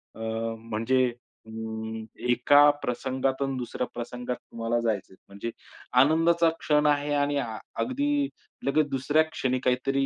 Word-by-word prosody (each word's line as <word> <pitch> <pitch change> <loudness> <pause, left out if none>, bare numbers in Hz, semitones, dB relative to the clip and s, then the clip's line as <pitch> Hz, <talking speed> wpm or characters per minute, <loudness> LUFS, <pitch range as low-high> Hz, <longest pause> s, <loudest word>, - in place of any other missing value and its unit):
अ, - - -12 0.4
म्हणजे 115 +3 +1 0.4
अं, 110 0 -5 0.2
एका 145 +5 +6
प्रसंगातून 130 +2 -1
दुसऱ्या 125 0 -3
प्रसंगात 125 +1 -4
तुम्हाला 115 0 -3
जायचंय, 105 -4 -2
म्हणजे 100 +4 -6 0.5
आनंदाचा 165 +3 +4
क्षण 150 0 +2
आहे 145 0 +2
आणि 145 0 +1 0.4
अगदी 285 +2 +1 0.4
लगेच 145 +2 +3
दुसऱ्या 145 +4 +2
क्षणी 130 -5 -1
काहीतरी 135 +2 +1
130 Hz, 115 wpm, -27 LUFS, 115-145 Hz, 0.5 s, एका